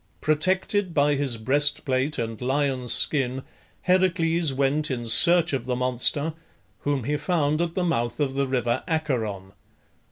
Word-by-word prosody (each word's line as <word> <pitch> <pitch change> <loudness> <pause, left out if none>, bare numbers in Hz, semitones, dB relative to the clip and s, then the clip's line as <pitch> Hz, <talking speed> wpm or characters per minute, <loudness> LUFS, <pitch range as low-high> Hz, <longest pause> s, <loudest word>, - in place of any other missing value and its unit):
Protected 185 +4 0
by 145 0 +3
his 135 -4 +1
breastplate 135 +2 0
and 115 -2 -5
lion's 130 -2 -1
skin 130 -2 -1 0.4
Heracles 175 -4 +1
went 140 +3 0
in 120 -3 -4
search 170 +7 +4
of 130 -2 -3
the 125 - -1
monster, 125 +5 +2 0.5
whom 145 -3 -2
he 150 +5 -1
found 155 -1 0
at 170 -1 -3
the 185 - -1
mouth 120 -9 -2
of 140 -3 -1
the 140 0 -1
river 125 -1 -1
Acheron. 115 - -3
145 Hz, 140 wpm, -24 LUFS, 125-160 Hz, 0.5 s, search